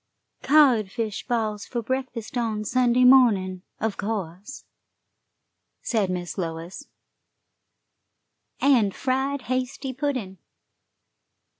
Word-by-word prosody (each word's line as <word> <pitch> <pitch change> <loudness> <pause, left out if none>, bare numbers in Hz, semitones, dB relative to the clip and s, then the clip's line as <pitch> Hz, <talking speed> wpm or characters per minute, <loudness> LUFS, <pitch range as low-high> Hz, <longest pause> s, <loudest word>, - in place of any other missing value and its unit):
"Codfish 230 -7 +2
balls 215 -4 -2
for 235 -2 -3
breakfast 255 -2 -4
on 220 -3 -1
Sunday 250 +1 +2
morning, 215 -8 +5 0.2
of 220 -2 -2
course," 200 +2 -5 1.2
said 215 -5 0
Miss 180 0 -4
Lois, 170 - -5 1.7
"and 235 -9 +3
fried 265 +1 -1
hasty 255 +1 -3
pudding. 255 - -3
230 Hz, 85 wpm, -24 LUFS, 200-260 Hz, 1.7 s, morning